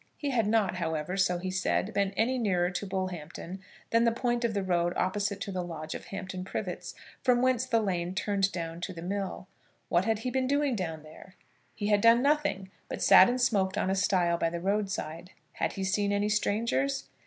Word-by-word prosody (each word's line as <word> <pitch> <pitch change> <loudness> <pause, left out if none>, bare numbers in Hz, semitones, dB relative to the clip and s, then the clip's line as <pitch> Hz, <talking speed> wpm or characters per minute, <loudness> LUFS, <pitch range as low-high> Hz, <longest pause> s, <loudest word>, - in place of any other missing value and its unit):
He 290 -2 -2
had 230 -5 +1
not, 210 -4 +2
however, 160 0 -2
so 180 -2 +2
he 185 +1 -4
said, 190 +2 0
been 200 -1 +1
any 250 +3 +2
nearer 180 -5 +1
to 195 +2 -4
Bullhampton 185 -1 -5 0.3
than 230 0 +4
the 230 - +4
point 240 0 -1
of 230 -2 0
the 200 - 0
road 175 -1 +1
opposite 200 +2 0
to 200 - -4
the 185 -1 -2
lodge 160 -2 -6
of - - -7
Hampton 185 -2 -6
Privets, 190 - -5 0.3
from 250 -2 +3
whence 255 -1 +2
the 230 -3 +3
lane 180 -3 -2
turned 195 -1 +1
down 165 -2 -5
to 185 +1 -4
the 165 -1 -8
mill. 195 0 -4 0.4
What 175 +2 +2
had 225 -1 +1
he 250 - 0
been 260 0 0
doing 285 -1 +1
down 160 -6 -4
there? 160 +4 -14 0.4
He 205 0 -2
had 205 -1 +4
done 230 +2 +6
nothing, 285 -10 +1 0.2
but - - -3
sat 185 - +8
and 250 +1 0
smoked 200 -6 +1
on 190 - +1
a - - +1
stile 180 -3 +2
by 165 - +1
the 170 +1 -4
road 200 +3 0
side. 175 -2 -5 0.2
Had - - -1
he 195 - -4
seen 200 +1 +1
any 205 +1 +1
strangers? 140 - 0
195 Hz, 210 wpm, -29 LUFS, 180-225 Hz, 0.4 s, sat